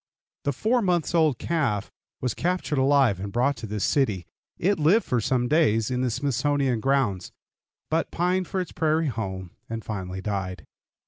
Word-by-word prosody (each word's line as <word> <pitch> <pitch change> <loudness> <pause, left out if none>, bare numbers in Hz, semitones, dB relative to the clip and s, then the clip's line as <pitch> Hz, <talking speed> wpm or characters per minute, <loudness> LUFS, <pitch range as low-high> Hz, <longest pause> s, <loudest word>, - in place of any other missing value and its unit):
The 140 - +2
four 225 - +1
months' 175 -5 +1
old 155 -6 +3
calf 135 -13 -1 0.3
was 125 -3 0
captured 175 -4 -1
alive 135 -7 +4
and 100 +1 -5
brought 125 +5 +2
to 115 - -6
this 105 -1 -3
city. 105 - +1 0.3
It 195 +1 +1
lived 175 +10 +4
for 120 -2 0
some 125 +2 +1
days 120 -7 +2
in 125 0 0
the 130 - +1
Smithsonian 135 0 0
grounds, 130 -7 0 0.6
but 165 +1 +1
pined 180 +1 0
for 190 - -2
its 180 - -3
prairie 160 -1 +1
home, 95 -6 -5 0.2
and 115 -1 -5
finally 95 -3 -4
died. 95 -5 -4
130 Hz, 170 wpm, -25 LUFS, 105-160 Hz, 0.6 s, alive